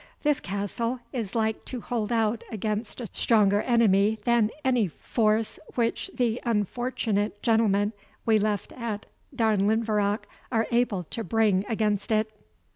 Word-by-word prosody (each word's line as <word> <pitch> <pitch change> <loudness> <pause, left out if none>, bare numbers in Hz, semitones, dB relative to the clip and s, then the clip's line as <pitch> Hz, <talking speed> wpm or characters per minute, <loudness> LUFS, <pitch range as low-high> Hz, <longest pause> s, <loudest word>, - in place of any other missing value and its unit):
This 295 -2 +2
castle 205 +6 -3
is 230 -6 -4
like 220 -1 0
to 255 - -5
hold 230 -1 -3
out 225 -1 +1
against 215 +2 -3
a 240 - -4
stronger 205 -3 +3
enemy 220 -3 +3
than 235 -3 +3 0.2
any 250 -6 +3
force 215 +5 0 0.2
which 235 +9 0
the 240 -2 0
unfortunate 215 -2 -1
gentlemen 215 -2 +3 0.3
we 220 -1 +4
left 210 -1 -1
at 225 -4 -4 0.3
Darnlinvarach 215 -1 +2 0.3
are 225 -2 +2
able 235 -6 +1
to 225 +7 -5
bring 210 -1 +2
against 210 -2 0
it." 215 0 +2
220 Hz, 130 wpm, -27 LUFS, 205-235 Hz, 0.3 s, we